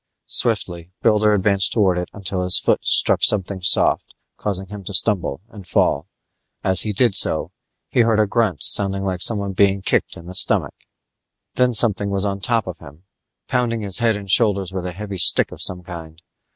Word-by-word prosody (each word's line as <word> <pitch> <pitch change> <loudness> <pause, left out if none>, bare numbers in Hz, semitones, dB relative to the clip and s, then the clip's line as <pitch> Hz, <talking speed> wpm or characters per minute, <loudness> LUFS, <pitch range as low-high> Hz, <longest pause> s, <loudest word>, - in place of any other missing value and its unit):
Swiftly 85 -1 -1
Builder 105 -1 +3
advanced 100 -1 +1
towards 95 -5 +1
it 90 - -8
until 95 -2 -4
his 90 0 +4
foot - - 0
struck - - +3
something 95 -2 0
soft, 90 - +1 0.2
causing 95 -2 -4
him 100 +1 -10
to 100 - -3
stumble 90 -6 +1
and 100 -4 -13
fall. - - 0 0.6
As 95 -1 +3
he 110 - 0
did 115 +1 +2
so, - - +2 0.4
he - - -2
heard 115 -2 +2
a 110 - +3
grunt 105 - -1
sounding 95 -1 0
like 95 -2 -4
someone 100 -3 +2
being 100 0 +1
kicked - - -1
in 85 - -13
the 90 - -9
stomach - - +3 0.8
Then 125 -1 +1
something 105 -3 +1
was 100 0 -3
on 100 -1 -3
top 115 +2 0
of 90 -3 -8
him, 75 +2 -15 0.4
pounding 120 -3 -1
his 100 -3 -2
head 115 -2 +1
and 100 -1 -8
shoulders 100 -3 +1
with 90 -1 -4
a - - -5
heavy 100 +1 -7
stick - - +4
of - - -9
some 90 -1 -2
kind. 80 -2 -10
100 Hz, 190 wpm, -19 LUFS, 90-105 Hz, 0.8 s, his